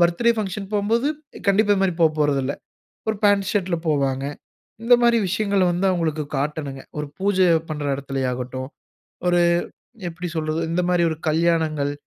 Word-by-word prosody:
Birthday 175 +8 +3
function 195 -1 -3
போம்போது 225 +7 +1 0.4
கண்டிப்பா, 205 +1 +4
இது 195 - -1
மாரி 190 -2 +2
போப்போறதுல்ல. 145 -4 +2 0.6
ஒரு 220 - 0
பாண்ட் 200 -2 +4
ஷர்ட்‌ல 185 -4 0
போவாங்க. 135 -3 +1 0.6
இந்தமாரி 235 0 +5
விஷயங்கள 200 0 +1
வந்து 180 +3 0
அவுங்களுக்கு 160 -4 -1
காட்டணுங்க. 140 -1 -3 0.2
ஒரு 150 - -2
பூஜை 190 -1 +3 0.2
பண்ற 150 -1 -4
இடத்தில 135 -1 -4
ஆகட்டும். 130 +1 -5 0.6
ஒரு 175 0 +3 0.7
எப்பிடி 175 +1 -6
சொல்றது, 155 +1 -1
இந்தமாரி 180 0 +1
ஒரு 160 - -3
கல்யாணங்கள், 155 -3 +1
170 Hz, 135 wpm, -22 LUFS, 150-195 Hz, 0.7 s, இந்தமாரி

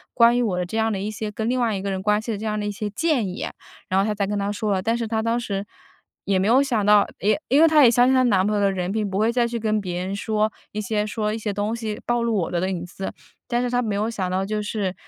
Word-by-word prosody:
关 235 0 +6
于 245 - +2
我 205 -7 0
的 180 - -1
这 220 - -5
样 225 0 +1
的 200 - -2
一 205 +2 -3
些 215 0 -4
跟 220 +1 -3
另 255 +1 +1
外 230 -3 +1
一 190 - -3
个 200 - -2
人 190 -1 -3
关 210 +1 +2
系 220 +2 -4
的 210 - -2
这 220 - -5
样 215 0 -1
的 205 - -3
一 205 - -1
些 205 +1 -4
建 260 0 0
议， 185 - -4 0.4
然 190 - +1
后 - - +1
她 210 - -1
才 200 - 0
跟 205 +1 -2
他 200 0 -1
说 210 0 -2
了。 190 -1 +1
但 230 +3 0
是 230 -1 -3
她 220 0 -1
当 230 +1 0
时 200 -4 -3 0.6
也 195 -1 +2
没 190 - +1
有 250 +5 +5
想 240 -7 0
到， 210 0 +5
也 215 +8 +2
因 280 +4 +5
为 330 - +8
她 310 -2 +6
也 245 - +8
相 245 +1 +4
信 260 - +4
她 255 - +4
男 195 -6 +3
朋 210 +1 +1
友 - - +1
的 200 -1 +3
人 185 -1 -2
品， 210 -1 -1
不 190 - -3
会 220 +2 +3
再 240 -1 +1
去 235 0 -3
跟 215 -1 0
别 180 -2 -3
人 190 - -3
说 215 +1 0 0.2
一 215 - -2
些 210 +1 -1
说 210 0 -2
一 225 - -2
些 210 -2 -3
东 205 +2 -1
西 220 -2 -4
暴 240 0 +1
露 235 -1 0
我 180 -5 -1
的 175 - 0
的 185 - -1
隐 175 -2 -3
私。 190 +2 -6 0.3
但 240 0 0
是 250 - -1
她 245 0 +2
没 215 -4 -2
有 215 +3 0
想 190 -5 -3
到 190 +1 -1
就 210 +1 -2
是 205 -3 -2
210 Hz, 350 characters per minute, -23 LUFS, 200-230 Hz, 0.6 s, 为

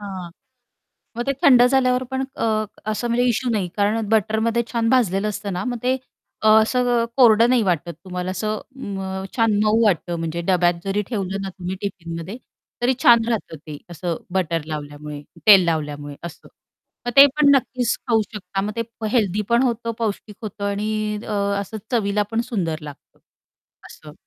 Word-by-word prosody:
हां, 190 -4 -7 0.9
मग 240 - -2
ते 275 - +2
थंड 250 -3 +7
झाल्यावर 255 -1 +2
पण 265 0 -1
अ, 215 -1 0 0.3
असं 225 +3 -2
म्हणजे 240 +1 +2
इश्यू 245 +1 0
नाही 205 -5 0
कारण 210 +1 0
बटरमध्ये 220 +2 +1
छान 230 -1 +1
भाजलेलं 210 -5 +2
असतं 210 -1 -4
ना, 180 - -3
मग 245 -2 -3
ते 255 +1 +2 0.5
अ, 220 - +4
असं 245 +1 +1
कोरडं 230 -2 +6
नाही 250 -2 +4
वाटत 170 -2 -1
तुम्हाला 180 0 -4
असं 215 +3 -2 0.2
मग 190 -5 -5
छान 225 -3 +3
अ, - - +1
मऊ 225 +2 +3
वाटतं 175 -3 +1
म्हणजे 165 +1 -3
डब्यात 175 -2 +3
जरी 200 +2 0
ठेवलं 195 -3 -2
ना, 195 - -4
तुम्ही 185 0 -6
टिफिनमध्ये 170 0 -5 0.5
तरी 250 +2 +3
छान 235 -1 +7
राहतं 220 -8 -2
ते 150 -2 -7
असं 170 0 -3 0.2
बटर 170 -4 -1
लावल्यामुळे, 150 -1 -7 0.3
तेल 200 -4 +9
लावल्यामुळे 145 -3 -3
असं. 170 - -9 0.6
मग - - +1
ते 275 - +11
पण 300 -1 +4
नक्कीच 250 -2 -1
खाऊ 225 -2 +4
शकता 195 -1 -4
मग 205 +2 -3
ते 230 - 0 0.3
हेल्थी 210 -4 +1
पण 235 +2 +4
होतं, 235 -2 -1
पौष्टिक 210 -2 -3
होतं 205 -1 -6
आणि 210 +1 -2
अ, - - -4 0.3
असं 200 +2 -6 0.2
चवीला 210 -3 +1
पण 225 0 0
सुंदर 170 -8 -2
लागतं 145 -2 -12 0.7
असं. - - -13
210 Hz, 170 wpm, -22 LUFS, 180-230 Hz, 0.9 s, ते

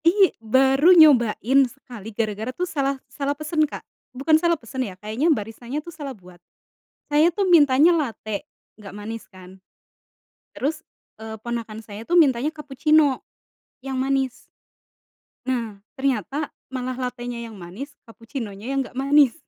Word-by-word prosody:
Iy 380 +3 +5
baru 270 +9 +5
nyobain 265 -4 +5
sekali 240 -5 -11
gara-gara 220 +1 -2
tuh 350 +8 -2
salah 275 -5 -1
salah 280 +2 -3
pesen 305 0 0
Kak, - - -8 0.3
bukan 280 +5 +1
salah 340 -1 +2
pesen 260 +1 -6
ya 195 -7 -4
kayaknya 220 - -1
baristanya 235 0 -2
tuh 335 +3 -6
salah 280 -5 -7
buat. 180 -2 -17 0.7
Saya 305 +4 +4
tuh 390 +1 0
mintanya 310 0 +6
late, 225 -4 -3 0.3
nggak 205 -2 -11
manis 215 +2 -7
kan. 185 0 -14 1.0
Terus, 310 +4 -3 0.3
eee, 220 0 -8
ponakan 230 -2 -5
saya 215 0 -10
tuh 345 - -3
mintanya 280 +1 +1
kapucino, 300 -1 +2 0.5
yang 265 0 -5
manis. 265 0 +1 1.1
Nah, 230 -6 -3 0.2
ternyata 275 +2 -1 0.2
malah 255 -1 -3
latenya 245 -1 -4
yang 225 -3 -9
manis 190 +11 -8 0.2
kapucinonya 225 -2 -8
yang 275 0 0
nggak 250 - -12
manis. 275 -1 +4
260 Hz, 140 wpm, -23 LUFS, 225-295 Hz, 1.1 s, mintanya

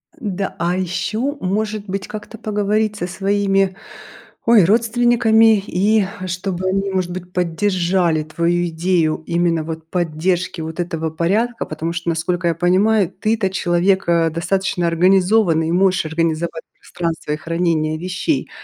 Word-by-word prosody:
Н-да, 200 - -4
а 175 +1 0
ещё, 215 - -2
может 210 +2 -2
быть, 195 0 -4
как-то 215 +1 -8
поговорить 210 0 0
со 175 -4 -3
своими, 195 0 +1 0.7
ой, 230 -6 +6
родственниками 225 0 +4
и 205 +2 +2 0.2
чтобы 185 0 -3
они, 195 +1 0
может 185 -2 -1
быть, 180 0 -7
поддержали 180 -2 +1
твою 170 +3 0
идею 165 -1 0
именно 170 -1 +1
вот 160 0 -7
поддержки 175 +1 -1
вот 160 +1 -6
этого 165 -2 -3
порядка. 210 +9 0
Потому 165 +2 -4
что, 170 0 -3
насколько 170 +2 -1
я 165 - 0
понимаю, 190 +3 +2
ты-то 215 0 -1
человек, 185 +1 +1
а, 165 -1 +3
достаточно 175 +2 -1
организованный, 180 -1 +3
и - - -1
можешь 185 -1 +2
организовать 160 +1 -2
пространство 165 -3 -4
и 150 - 0
хранение 165 -1 -1
вещей, 185 - -2
180 Hz, 135 wpm, -19 LUFS, 170-205 Hz, 0.7 s, ой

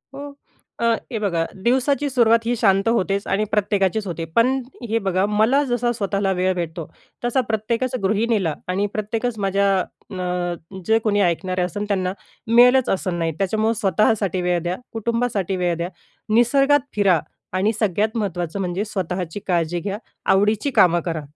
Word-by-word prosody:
हो, 285 +1 -7 0.5
अ, 235 - 0 0.3
हे 225 - -2
बघा, 170 -6 0 0.2
दिवसाची 275 +4 +2
सुरुवात 230 -3 +3
ही 245 - +1
शांत 195 -2 +2
होतेच 200 -3 0
आणि 200 +2 +1
प्रत्येकाचीच 205 0 +1
होते, 165 -1 -4
पण 255 +3 +3 0.3
हे 230 +1 +1
बघा, 185 +1 +2
मला 220 +7 +3
जसा 245 -1 0
स्वतःला 200 -3 -1
वेळ 185 +1 +1
भेटतो, 165 -2 -4 0.4
तसा 245 +2 +2
प्रत्येकच 230 +4 -1
गृहिणीला 205 -4 +1
आणि 195 +3 0
प्रत्येकच 220 +2 -2
माझ्या 200 0 +1 0.4
अ, - - -6 0.7
जे 220 0 +4
कोणी 210 -2 +1
ऐकणारे 185 +1 0
असन, 185 +4 -2
त्यांना 185 -2 0 0.3
मिळेलच 245 +2 +5
असं 185 -2 -1
नाही. 165 -1 0
त्याच्यामुळं 220 +3 +1
स्वतःसाठी 195 -1 +1
वेळ 180 -1 +1
द्या, 175 +1 -1 0.2
कुटुंबासाठी 225 -4 -1
वेळ 175 -1 0
द्या, 170 +1 -3 0.4
निसर्गात 275 +4 +4
फिरा 195 -5 +4 0.4
आणि 205 +4 +2
सगळ्यात 215 +2 0
महत्त्वाचं 180 -3 -3
म्हणजे 185 +3 -2
स्वतःची 185 -2 -4
काळजी 175 -1 0
घ्या, 200 +4 -4 0.4
आवडीची 215 +7 +2
कामं 175 -1 +5
करा. 165 -3 -2
205 Hz, 150 wpm, -21 LUFS, 185-230 Hz, 0.7 s, मिळेलच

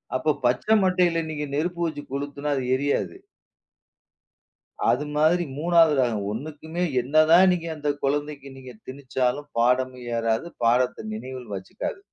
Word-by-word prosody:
அப்போ 155 +4 +1
பச்ச 120 +1 +1 0.2
மட்டைல 180 -3 +2
நீங்க 150 -1 -3
நெருப்ப 175 +4 -2
வச்சு 150 -3 -4
கொளுத்துனா 145 +1 -3
அது 135 - -2
எரியாது. 140 - -1 1.8
அது 150 - 0
மாதிரி 160 +4 +3
மூனாவது 165 0 +4
ரகம், 115 -5 0
ஒண்ணுக்கும்மே 155 +7 -5 0.2
என்னதா 155 +6 +5
நீங்க 170 -2 -2
அந்த 150 -1 -2
கொழந்தைக்கு 145 0 -2
நீங்க 130 -1 -11
திணிச்சாலும் 130 +1 -2
பாடமே 125 +1 +1 0.2
ஏறாது, 115 +6 0 0.2
பாடத்த 120 -1 +1
நினைவில் 125 0 -7
வச்சுக்காது. 95 - -6
145 Hz, 125 wpm, -24 LUFS, 125-155 Hz, 1.8 s, என்னதா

